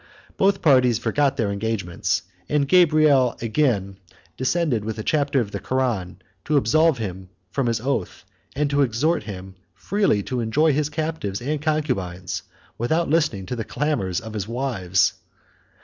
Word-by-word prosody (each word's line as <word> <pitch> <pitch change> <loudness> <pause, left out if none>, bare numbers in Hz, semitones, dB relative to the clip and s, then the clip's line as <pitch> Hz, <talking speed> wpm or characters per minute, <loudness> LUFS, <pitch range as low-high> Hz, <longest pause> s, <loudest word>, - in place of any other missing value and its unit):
Both 195 0 +2
parties 130 -6 +5
forgot 135 +5 +1
their 105 -3 0
engagements; 100 -5 -2 0.3
and 145 -2 +1
Gabriel 155 -7 +4
again 110 -6 0 0.4
descended 130 -4 0
with 110 +1 -4
a 110 - -4
chapter 140 0 +1
of 105 -3 -5
the - - -4
Koran, 120 -9 -1 0.3
to 150 - +2
absolve 155 +4 +3
him 95 -4 -6 0.2
from 130 +4 0
his 115 -1 0
oath, 120 -6 -3 0.3
and 145 +1 +1
to 145 0 +2
exhort 140 +7 +1
him 95 -2 -8 0.2
freely 110 - +1
to 125 +4 -3
enjoy 145 +7 +2
his 150 +1 0
captives 155 -10 -3
and 145 +4 -2
concubines, 120 - -2 0.4
without 160 +7 0
listening 150 - +1
to 110 - -4
the 115 - -3
clamors 110 - -1
of 110 -1 -9
his 105 -2 -3
wives. 110 -8 +1
125 Hz, 150 wpm, -23 LUFS, 100-150 Hz, 0.4 s, parties